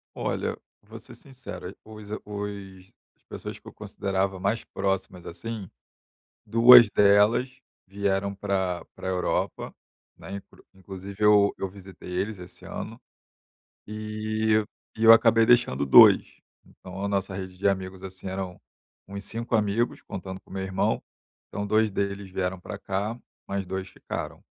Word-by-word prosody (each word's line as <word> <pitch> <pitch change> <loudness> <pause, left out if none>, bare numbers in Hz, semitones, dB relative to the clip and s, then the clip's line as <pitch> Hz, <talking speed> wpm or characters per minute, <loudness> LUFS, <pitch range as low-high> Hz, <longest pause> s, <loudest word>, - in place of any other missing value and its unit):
Olha, - - -2 0.3
vou - - -11
ser - - -14
sincero, 115 -9 -9
os 110 -1 -12
os 100 -2 -7 0.3
as - - -41
pessoas - - -7
que - - -19
eu - - -10
considerava 95 -1 -2
mais 100 +5 -1
próximas 95 -2 -3
assim, 105 +3 -6 0.8
2 115 +1 +8
delas 105 +5 +4 0.4
vieram 100 0 -1
para 95 -3 -2
para - - -7
a - - 0
Europa, 90 -1 -2 0.5
né, 100 +1 -7 0.3
inclusive 95 +1 -9
eu 105 -1 +5
eu 95 - -4
visitei 95 -2 -12
eles 95 +3 -2
esse 90 0 -12
ano - - -7 0.9
e 110 0 -1 0.3
e 110 - -2
eu 115 0 +10
acabei 115 0 +5
deixando 115 - +3
2. 65 - +7 0.2
Então 95 +1 -10
a - - 0
nossa 100 -1 -2
rede 95 -1 -6
de 100 - +2
amigos, 95 -1 -2
assim, 95 0 -8
eram 95 -1 -5 0.5
uns 100 +1 -7
5 115 +3 -2
amigos, 110 +2 0
contando 95 0 -7
com - - -26
meu 95 0 -4
irmão. 95 0 0 0.5
Então 100 0 -4
2 110 +1 +2
deles 100 0 -3
vieram 95 0 -2
para - - -8
cá, 100 +4 -2 0.3
mais 100 -1 -3
2 95 +1 -4
ficaram. - - -7
100 Hz, 145 wpm, -26 LUFS, 95-105 Hz, 0.9 s, eu